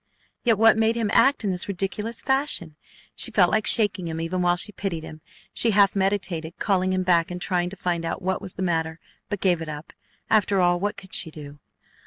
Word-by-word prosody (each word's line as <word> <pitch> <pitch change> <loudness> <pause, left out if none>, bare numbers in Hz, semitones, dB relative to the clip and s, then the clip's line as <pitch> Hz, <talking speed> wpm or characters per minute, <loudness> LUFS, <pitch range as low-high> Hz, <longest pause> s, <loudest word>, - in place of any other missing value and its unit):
Yet 230 -4 +3
what 225 +1 +5
made 225 +1 +2
him 225 -3 -1
act 270 -3 +4
in 200 - 0
this 180 -1 0
ridiculous 200 +4 -3
fashion? 265 - -1 0.4
She - - +2
felt 190 -6 +3
like 215 0 +1
shaking 205 -5 +2
him 160 0 -4
even 170 +3 -2
while 175 0 +3
she 210 - -1
pitied 185 -5 -4
him. 155 -1 -10 0.3
She 235 - +2
half 200 -2 +4
meditated 190 -4 -2
calling 185 -2 0
him 185 0 0
back 170 -2 +2
and 180 0 -5
trying 180 -1 -1
to 195 - -8
find 175 -3 -2
out 165 - -3
what 190 +1 -2
was 185 - -5
the 190 - -4
matter, 160 -2 -1 0.3
but 205 -2 -4
gave 175 -4 +2
it 160 - -6
up. 150 0 -8 0.3
After 205 -2 +2
all, 175 -1 +3
what 205 +2 -2
could 190 - -12
she 180 -2 0
do? 145 -2 -11
185 Hz, 220 wpm, -24 LUFS, 170-205 Hz, 0.4 s, what